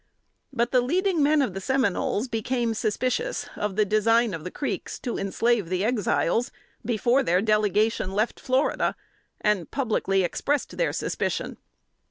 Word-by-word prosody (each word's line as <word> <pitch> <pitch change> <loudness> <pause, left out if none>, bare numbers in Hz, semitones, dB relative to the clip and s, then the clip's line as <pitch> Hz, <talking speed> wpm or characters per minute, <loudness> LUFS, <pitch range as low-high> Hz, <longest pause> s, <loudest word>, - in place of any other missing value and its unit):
But 240 -2 0
the 255 - +4
leading 350 +6 +1
men 295 0 +4
of 210 - -2
the 195 - -5
Seminoles 250 -2 0
became 235 0 -1
suspicious 255 - -1
of 210 -2 -3
the 215 0 +3
design 225 +2 +3
of 160 -2 -5
the 180 - -4
Creeks 275 - -4
to 245 - -3
enslave 205 0 0
the 185 +2 0
Exiles, 230 -1 +1 0.3
before 240 +3 +2
their 180 -6 +2
delegation 210 -1 +1
left 215 +4 0
Florida, 260 +3 +1 0.5
and 210 -6 +1
publicly 210 -7 0
expressed 280 - -1
their - - +1
suspicion. - - -2
225 Hz, 145 wpm, -25 LUFS, 205-255 Hz, 0.5 s, the